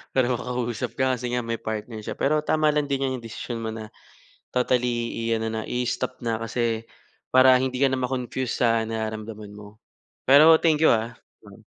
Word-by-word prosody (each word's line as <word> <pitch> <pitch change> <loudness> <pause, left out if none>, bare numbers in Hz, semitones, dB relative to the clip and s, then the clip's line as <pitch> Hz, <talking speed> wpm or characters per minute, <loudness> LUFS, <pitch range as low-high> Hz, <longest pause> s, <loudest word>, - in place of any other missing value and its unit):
para 130 -2 +3
makausap 120 -1 -3
ka, 130 0 +2
kasi 125 0 -5
nga 125 - 0
may 115 -1 -3
partner 110 0 -5
siya. - - -6
Pero 150 +2 +2
tama 155 -1 +2
lang 145 -1 0
din 135 0 0
'yang 130 -2 -3
desisyon 115 +1 -6
mo 110 - -2
na 110 -1 -8 0.6
totally 125 -2 0 0.2
i-ano 110 -1 -1
na, 110 0 -3
i-stop 125 +1 -2
na, 115 -1 -1
kasi 115 -1 -2 0.4
para 130 0 +7
hindi 130 -1 -1
ka 135 -1 +4
na 130 - -1
ma-confuse 125 0 -2
sa 115 -2 +2
nararamdaman 110 -1 -5
mo. 105 0 -12 0.5
Pero, 155 +4 +8
thank 160 -2 +2
you, - - +6
ah. 115 +1 +1 0.3
Mm. - - -15
120 Hz, 180 wpm, -24 LUFS, 110-130 Hz, 0.6 s, Pero